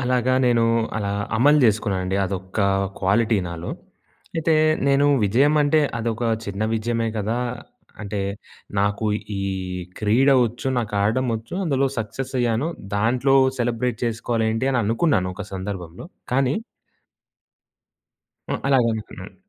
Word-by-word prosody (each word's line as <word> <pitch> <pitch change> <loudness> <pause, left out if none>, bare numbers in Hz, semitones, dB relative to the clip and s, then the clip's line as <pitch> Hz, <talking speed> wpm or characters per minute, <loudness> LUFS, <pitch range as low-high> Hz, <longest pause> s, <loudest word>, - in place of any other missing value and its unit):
అలాగా 125 0 +1
నేను, 115 -1 +3 0.3
అలా 100 -1 -2 0.2
అమలు 145 +5 +5
చేసుకున్నానండి. 100 -4 +1
అదొక్క 95 +1 -5 0.4
క్వాలిటీ 105 +3 +2
నాలో. 85 0 -6 0.7
అయితే, 160 0 +2 0.3
నేను 140 +1 +4 0.2
విజయం 135 +9 +3
అంటే 150 +2 +3 0.2
అదొక 115 0 -2 0.2
చిన్న 100 0 -4
విజయమే 115 +1 -1
గదా! 110 +4 -1 0.6
అంటే 100 0 -4 0.6
నాకు 100 +2 0 0.3
ఈ - - -2 0.6
క్రీడ 115 +6 +3 0.2
ఒచ్చు, 120 +4 -7
నాకు 110 -3 -3
ఆడడం 125 +5 +1
ఒచ్చు, 115 +9 -9
అందులో 135 -3 +1
సక్సెస్‌ 120 +5 -5
అయ్యానుదాంట్లో. 120 0 0 0.2
సెలబ్రేట్ 120 0 -1
చేసుకోలెంటి 115 +1 -1
అని 125 - +2
అనుకున్నాను. 115 - +1
ఒక 105 +1 -7
సందర్భంలో! 95 - -6 0.3
కానీ 135 +1 +2 2.0
ఆ! - - +1
అలాగనుకున్నాను. 110 -7 0
115 Hz, 110 wpm, -22 LUFS, 100-130 Hz, 2.0 s, అమలు